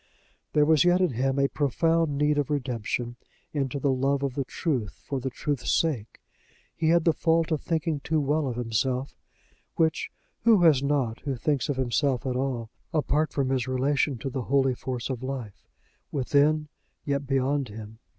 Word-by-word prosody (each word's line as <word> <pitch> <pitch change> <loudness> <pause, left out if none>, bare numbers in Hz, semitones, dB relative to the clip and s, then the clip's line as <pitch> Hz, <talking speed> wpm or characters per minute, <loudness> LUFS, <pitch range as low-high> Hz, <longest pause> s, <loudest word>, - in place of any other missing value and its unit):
There 150 -1 +4
was 155 -2 +5
yet 175 +1 +4
in 185 -5 +2
him 130 +3 0
a 140 0 +3
profound 155 +2 +1
need 150 0 +2
of 145 - -1
redemption 120 -3 -2 0.4
into 140 -2 -1
the 140 0 +2
love 135 +2 +1
of 135 -2 -1
the 140 - -1
truth 125 - -2
for 140 - -2
the 130 +1 -3
truth's 140 0 -3
sake. 135 -10 0 0.6
He 160 -1 +1
had 170 0 +4
the 165 - +5
fault 165 0 +1
of 155 - 0
thinking 160 -2 -1
too 155 +2 0
well 145 +1 +1
of 125 - -3
himself 125 +3 -1 0.6
which 160 -1 +1 0.3
who 220 -6 +5
has 150 -6 +6
not 140 -5 0
who 140 -3 -3
thinks 145 +3 0
of 145 - +1
himself 130 +1 0
at 130 -1 -1
all, 125 -4 -2 0.2
apart 155 0 +1
from 135 -2 0
his 130 -1 0
relation 135 +1 +1
to 135 +4 -5
the 130 0 -2
holy 135 +1 +2
force 125 -1 -4
of 130 -3 -4
life, 130 -6 -6 0.4
within 150 +2 +2 0.4
yet 140 -1 -1
beyond 135 0 +1
him? 110 +1 -10
140 Hz, 180 wpm, -27 LUFS, 130-150 Hz, 0.6 s, has